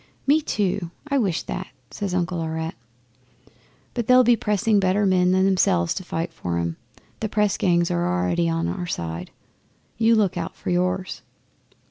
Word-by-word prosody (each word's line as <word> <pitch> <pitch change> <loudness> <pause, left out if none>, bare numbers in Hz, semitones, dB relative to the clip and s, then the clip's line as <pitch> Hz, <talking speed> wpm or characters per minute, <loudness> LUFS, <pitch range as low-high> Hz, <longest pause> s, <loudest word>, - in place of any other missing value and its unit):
'"Me 295 +3 +4
too, 200 - -1 0.2
I 280 -1 +2
wish 190 -8 0
that," - - -5 0.2
says 195 -3 -3
Uncle 175 -1 -1
Aurette. 160 0 -3 1.2
"But 235 -3 -3
they'll 255 0 +7
be 240 0 +5
pressing 210 0 +1
better 195 +2 +2
men 180 -1 +3
than 190 +1 +3
themselves 90 - +2
to - - -5
fight 165 -1 -4
for 85 -1 -3
'em. 85 -1 -2 0.4
The 220 - -2
press 210 -1 +1
gangs 175 -2 +2
are 85 0 0
out 90 0 0
already 165 - +1
on 165 0 -1
our 180 -2 -3
side. 85 - -4 0.7
You 230 0 +5
look 200 -5 +1
out 165 -1 -4
for - - -4
yours." 185 +1 -1
180 Hz, 170 wpm, -23 LUFS, 165-205 Hz, 1.2 s, they'll